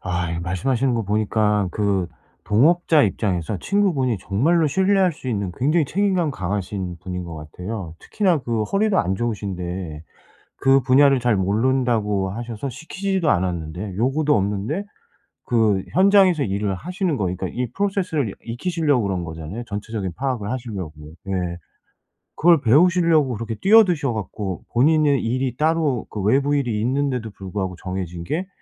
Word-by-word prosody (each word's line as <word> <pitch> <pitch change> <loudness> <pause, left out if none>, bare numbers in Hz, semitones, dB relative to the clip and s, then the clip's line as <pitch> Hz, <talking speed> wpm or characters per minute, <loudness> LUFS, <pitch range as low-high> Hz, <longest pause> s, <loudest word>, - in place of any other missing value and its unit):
아 90 -2 -2
이거 85 0 -3
말씀하시는 120 +9 0
거 115 - 0
보니까 105 -1 +1
그 100 -4 0 0.4
동업자 155 - +4
입장에서 95 -2 -1
친구분이 165 - +1
정말로 155 - +1
신뢰할 190 +4 +2
수 145 -4 -8
있는 100 -5 -2
굉장히 155 +5 +2
책임감 185 -1 +1
강하신 95 -3 -4
분인 90 0 -5
것 85 -1 -7
같아요. 90 +4 -7
특히나 185 - +1
그 115 -4 -2
허리도 195 - +1
안 95 +2 0
좋으신데 95 -7 -4 0.5
그 135 0 +4
분야를 135 +1 +5
잘 120 -2 +2
모른다고 105 -1 +1
하셔서 120 +4 -5
시키지도 185 - -2
않았는데 90 - -2
요구도 135 +8 +1
없는데 105 - -1 0.6
그 110 -5 +2
현장에서 190 -4 +5
일을 100 -1 -1
하시는 180 - -2
거 105 - -1
그러니까 95 +1 -2
이 125 +7 -3
process를 190 - -1
이 - - -9 0.2
익히시려고 150 -2 0
그런 95 -3 -2
거잖아요. 80 +8 -7
전체적인 105 -2 -4
파악을 130 -6 -2
하시려고. 110 -10 -5 0.3
네. 95 - -4 1.1
그걸 165 -2 +5
배우시려고 160 +1 +4
그렇게 115 +1 -4
뛰어드셔 180 - +4
갖고 100 -2 -5
본인의 145 +2 +3
일이 125 +1 -1
따로 155 -5 +1
그 105 - -5
외부 140 +8 +2
일이 120 -7 0
있는데도 125 -2 -1
불구하고 95 -1 -5
정해진 90 -2 -5
게 170 - -3
115 Hz, 365 characters per minute, -22 LUFS, 95-150 Hz, 1.1 s, 분야를